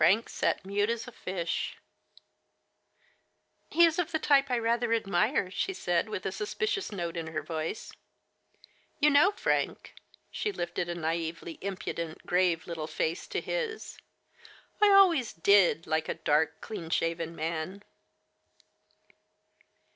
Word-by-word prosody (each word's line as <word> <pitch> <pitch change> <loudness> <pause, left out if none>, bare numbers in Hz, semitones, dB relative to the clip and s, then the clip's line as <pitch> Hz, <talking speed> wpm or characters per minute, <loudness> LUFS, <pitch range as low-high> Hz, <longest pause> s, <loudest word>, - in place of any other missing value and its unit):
Frank 195 +8 +4
sat - - -1
mute 205 +2 0
as 235 +1 -2
a - - -8
fish. 180 -6 -3 1.0
" - - -41
He 340 +1 +6
is 330 +1 +1
of 340 -1 -1
the 320 - +1
type 280 -3 +3
I 250 - +2
rather 235 0 +1
admire," 210 0 +1
she 385 - -1
said, 175 - 0
with 185 - -5
a - - 0
suspicious 400 - -2
note 175 -4 -4
in 165 -1 -4
her 155 -2 -4
voice. 160 +5 -4 0.6
" - - -30
You 300 0 +5
know, 290 +7 +6
Frank," - - -1 0.4
she 420 - -2
lifted 175 - -3
a 175 - -2
naively 165 0 -3
impudent, 170 -4 -5
grave 180 -2 +2
little 165 -3 -5
face 160 +1 -2
to - - -2
his, 460 -3 -4 0.8
I 420 - +7
always 360 - +5
did 180 -1 +4
like 155 0 -1
a - - -1
dark, 160 +2 +1
clean 170 -7 -6
shaven 165 0 -1
man!" 165 +5 -4
190 Hz, 140 wpm, -29 LUFS, 165-250 Hz, 1.0 s, I